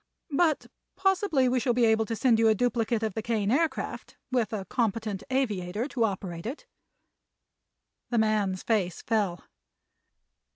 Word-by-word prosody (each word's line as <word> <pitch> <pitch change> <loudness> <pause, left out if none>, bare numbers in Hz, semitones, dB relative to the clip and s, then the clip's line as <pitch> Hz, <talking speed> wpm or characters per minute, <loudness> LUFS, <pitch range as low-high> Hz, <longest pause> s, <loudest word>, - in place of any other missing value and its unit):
But 310 +1 +2 0.3
possibly 380 -8 +2
we 250 +1 +2
shall 245 -1 +1
be 245 -1 +4
able 220 0 +3
to 230 - -2
send 230 -1 +3
you 225 - +5
a 220 - +5
duplicate 230 -1 0
of 220 -3 -1
the 220 - -3
Kane 215 -2 0
Aircraft, 315 +5 -1
with 240 -5 +1
a 205 -3 -3
competent 220 -2 -1
aviator 215 -4 -1
to 235 -5 +1
operate 185 -3 -4
it." 285 - -6 1.4
The 240 - 0
man's 210 -4 +1
face 195 -7 0
fell. 205 -6 0
225 Hz, 150 wpm, -28 LUFS, 210-255 Hz, 1.4 s, you